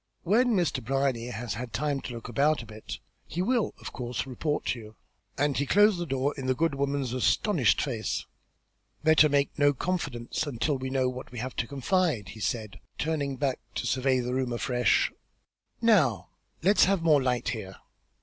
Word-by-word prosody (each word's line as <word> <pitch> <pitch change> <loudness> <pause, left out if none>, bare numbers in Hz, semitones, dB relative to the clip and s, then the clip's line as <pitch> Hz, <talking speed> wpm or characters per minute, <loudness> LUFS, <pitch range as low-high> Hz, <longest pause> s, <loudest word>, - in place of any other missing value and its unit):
"When 230 +6 +3
Mr. 170 -8 0
Brierly 135 -1 0
has 120 -2 -4
had 120 +1 -6
time 140 +4 -1
to 125 - -6
look 115 -1 -7
about 140 +3 +2
a - - -11
bit 110 0 -8 0.3
he 175 +4 -2
will 235 +1 +1
of - - -8
course 125 0 -3
report 145 +3 -2
to 120 - -1
you." 110 -1 -12 0.4
And 145 +1 +1
he 140 - 0
closed 205 +1 +5
the 175 - -3
door 135 +1 0
in 130 - -4
the 130 - +2
good 165 +2 +1
woman's 140 -2 -1
astonished 135 - +2
face. 120 -6 -2 0.8
"Better 155 -1 +6
make 140 +1 +1
no 145 0 +5
confidants 150 -4 -2
until 140 +2 -1
we 130 0 -3
know 130 -1 +1
what 125 0 -6
we 125 - -9
have 125 +3 -4
to 120 - -1
confide," 140 - 0
he 110 - -10
said, 110 -1 -3 0.2
turning 145 -3 -1
back 135 -2 0 0.2
to - - -2
survey 130 0 +2
the 125 +1 -3
room 130 -1 -1
afresh. 125 +1 +2 0.7
"Now 175 - +3 0.3
let 200 +3 +4
us - - +8
have 190 -2 +1
more 155 -4 +5
light 125 -2 0
here." 95 -5 -5
135 Hz, 190 wpm, -28 LUFS, 120-155 Hz, 0.8 s, us